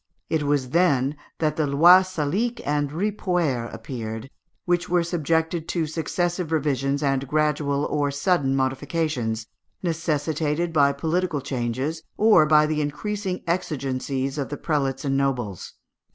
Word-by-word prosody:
It 160 - +2
was 145 -3 0
then 145 -5 +2 0.2
that 155 -2 0
the 155 -2 +1
lois 175 +6 +6
Salique 200 +11 -1
and 145 0 0
Ripuaire 175 - -1
appeared, 115 +1 -6 0.3
which 175 0 0
were 175 -1 +3
subjected 165 0 -1
to 170 -3 0
successive 170 +2 -2
revisions 140 -2 0
and 135 -1 0
gradual 150 -1 +1
or 145 -1 0
sudden 140 -2 +1
modifications, 130 -4 -1 0.4
necessitated 160 0 -1
by 140 -2 +4
political 160 +3 -1
changes 130 +4 -3 0.2
or 210 -8 +6
by 150 0 +6
the 155 0 0
increasing 190 +5 -3
exigencies 135 -4 -2
of 140 - -3
the 145 - -4
prelates 140 -4 -1
and 135 -1 +1
nobles. 125 -9 -2
150 Hz, 130 wpm, -24 LUFS, 135-170 Hz, 0.4 s, lois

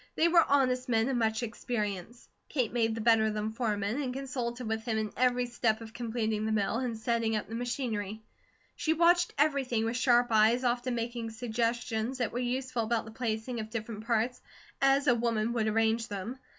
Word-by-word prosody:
They 330 - +4
were 340 -1 +6
honest 255 -2 +1
men 225 +1 +2
of 265 - 0
much 220 0 0
experience. 220 -1 -4 0.2
Kate 250 -7 -1
made 225 -2 +1
the 225 - -4
better 225 -1 +4
of 215 - -2
them 215 +1 -2
foreman, 220 +1 -1
and 260 -3 -2
consulted 250 -2 -4
with 220 0 -2
him 225 -2 -1
in 215 -1 -2
every 250 0 +2
step 235 -2 0
of 225 -1 -10
completing 220 -3 -2
the - - 0
mill, 210 0 +1
and 240 -2 -2
setting 225 0 0
up 215 - -2
the 225 - -9
machinery. 225 -4 -3 0.5
She 320 - +1
watched 345 +2 +4
everything 270 -6 +1
with 230 +1 -1
sharp 245 -1 +3
eyes, 220 +3 +4
often 245 0 0
making 235 0 -3
suggestions 230 +1 -2
that 245 -3 -1
were 240 - -3
useful 255 0 -1
about 225 0 0
the 220 - -9
placing 225 +1 -3
of 215 0 -5
different 220 -1 -6
parts 235 +1 0 0.4
as 275 +1 +4
a 250 - +5
woman 230 -1 0
would 225 -2 0
arrange 225 +1 +1
them. 210 +6 -5
235 Hz, 195 wpm, -30 LUFS, 220-250 Hz, 0.5 s, were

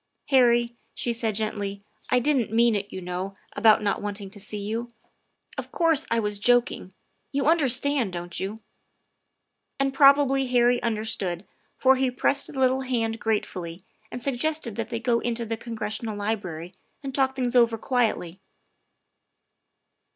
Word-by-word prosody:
" - - -53
Harry," 240 -2 +4 0.2
she 240 - -1
said 225 -2 -1
gently, 205 -2 -2 0.2
" 215 - -32
I 250 - +3
didn't 250 -3 +1
mean 230 +1 +4
it, 205 -1 -3
you 185 - -6
know, 180 +2 -4 0.2
about 215 -1 +5
not 200 - 0
wanting 205 -1 -5
to 205 - -8
see 210 +1 -5
you. 220 +4 -4 0.7
Of - - -7
course, 330 -4 +2
I 230 - +2
was 210 -2 -2
joking. 240 -5 +1 0.4
You 275 -1 -1
understand, 280 - +2
don't 175 -1 -5
you?" 205 +4 -5 1.2
And 275 -1 +1
probably 275 -1 +5
Harry 245 0 +3
understood, 215 -5 -1 0.3
for 265 0 +4
he 260 0 +1
pressed 275 +2 +1
the 270 - -6
little 260 0 +3
hand 230 -3 -1
gratefully 185 -5 -3 0.3
and 245 - -5
suggested 275 -1 -1
that 230 -2 -4
they 230 -1 -3
go 235 0 +1
into 235 -1 -2
the 225 +1 -2
Congressional 220 -1 -4
Library 190 -5 -4 0.3
and 270 -1 -5
talk 265 0 +1
things 255 -1 -1
over 235 -2 +4
quietly. 220 -8 -1
230 Hz, 155 wpm, -25 LUFS, 205-255 Hz, 1.2 s, about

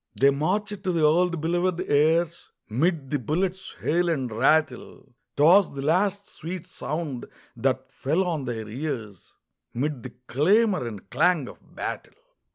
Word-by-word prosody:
They 140 +1 +6
marched 200 +8 -1
to 185 - 0
the 165 -3 0
old 170 +3 +3
belovèd 175 +2 0
airs 160 +3 +2 0.2
'Mid 145 - 0
the 145 - +1
bullets' 180 - -2
hail 175 +2 +1
and 135 -7 -1
rattle; 130 +2 0 0.2
'Twas 175 +7 +5
the 135 - -4
last 195 +6 +1
sweet 170 +1 -7
sound 150 -4 -5 0.3
that 130 0 -1
fell 155 +8 0
on 165 -7 -2
their 115 -3 -4
ears 115 - -6 0.4
'Mid 140 +1 -2
the 125 +1 -9
clamor 185 - +2
and 105 -4 -8
clang 155 0 +2
of - - -11 0.2
battle. - - -5
155 Hz, 145 wpm, -25 LUFS, 130-180 Hz, 0.4 s, They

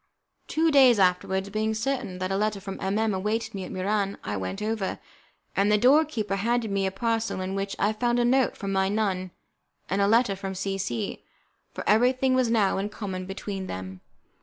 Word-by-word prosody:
Two 320 +1 +2
days 260 -5 +6
afterwards, 190 +1 +1
being 215 +1 0
certain 245 -5 -2
that 185 +1 -3
a - - +1
letter 210 0 0
from 195 0 -7
M 195 +2 0
M 220 -1 +1
awaited 220 +4 -2
me 190 -2 -5
at - - -8
Muran, 200 +1 -1
I 105 - -3
went 95 - -4
over, 215 -2 -2 0.6
and 200 +2 +3
the 210 - +5
door 275 +8 +5
keeper 215 -9 -2
handed 230 +1 0
me 195 -1 +1
a - - -2
parcel 225 +1 -1
in 185 +1 -3
which 195 0 -3
I 205 +2 +1
found 240 +2 0
a 240 - +2
note 260 +1 +2
from 195 -2 -4
my 190 0 +1
nun 195 -3 -1 0.6
and 195 +1 +1
a 200 - +4
letter 225 -1 +3
from 195 0 -5
C 195 +1 -3
C, 120 -11 -3 0.5
for - - -7
everything 255 +4 +3
was 255 -2 +2
now 210 -4 +2
in 200 +2 -2
common 190 -4 -5
between 195 0 -5
them. 95 0 -7
200 Hz, 205 wpm, -26 LUFS, 190-225 Hz, 0.6 s, days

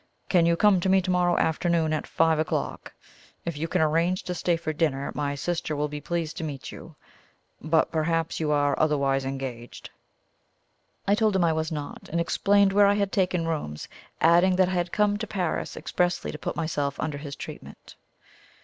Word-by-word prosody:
Can 170 -3 +4
you 170 - +3
come 205 -2 +5
to 190 - 0
me 190 0 +5
tomorrow 180 -1 +1
afternoon 160 -1 +1
at 155 - -2
five 160 -1 +2
o'clock? 155 - -3 0.5
If 170 -2 -3
you 155 +3 -3
can 165 0 +1
arrange 165 +4 +1
to 180 - -3
stay 175 -1 0
to 155 -1 -3
dinner, 145 -3 -1
my 145 -1 -2
sister 160 +1 -2
will 150 +1 -1
be 150 0 -6
pleased 165 -1 -3
to 170 - -4
meet 145 -4 -6
you; - - -11 0.7
but 160 +1 +2
perhaps 165 0 0
you 155 -2 0
are 145 -1 +2
otherwise 140 -3 +1
engaged?" 130 -3 -6 1.2
I 200 - +4
told 215 -1 +2
him 190 - +3
I 165 -1 +3
was 160 +1 -2
not, 150 -2 -6
and 170 - -1
explained 200 +3 +3
where 200 0 +6
I 200 - +3
had 200 -1 0
taken 180 -4 0
rooms, 110 - -4 0.3
adding 175 +3 +5
that 185 0 +3
I - - -2
had 175 -1 -1
come 205 -1 +2
to - - -4
Paris 180 -5 -3
expressly 180 0 -1
to - - -8
put - - -4
myself 145 -4 -2
under 150 -2 -3
his 140 -1 -7
treatment. - - -10
165 Hz, 190 wpm, -26 LUFS, 150-180 Hz, 1.2 s, where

